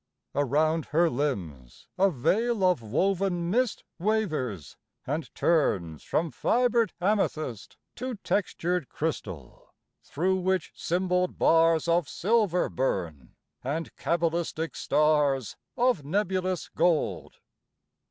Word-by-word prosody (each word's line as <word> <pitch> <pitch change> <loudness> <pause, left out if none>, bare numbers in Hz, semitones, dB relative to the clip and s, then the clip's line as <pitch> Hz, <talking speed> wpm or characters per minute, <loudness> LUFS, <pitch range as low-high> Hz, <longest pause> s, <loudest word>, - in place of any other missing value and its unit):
Around 150 +3 +1
her 165 +2 +2
limbs 90 - -4
a 195 +1 +4
veil 210 - +1
of 180 -8 +3
woven 175 - 0
mist 250 +1 0 0.2
Wavers, 155 - -1 0.3
and 150 +4 -3
turns 95 - +1
from 165 -1 -1
fibered 240 -2 +2
amethyst 160 - -1 0.2
To 255 0 -4
textured 180 -3 -1
crystal; 95 - -5 0.3
through 185 +5 0
which 185 -1 0
symboled 180 +1 0
bars 165 0 +4
Of 170 -3 +2
silver 205 -3 +1
burn, 85 - -3 0.3
and 155 +6 -3
cabalistic 165 -1 -1
stars 145 -6 +2 0.2
Of 245 - +2
nebulous 185 +2 -1
gold. 170 -2 0
165 Hz, 100 wpm, -27 LUFS, 140-190 Hz, 0.3 s, a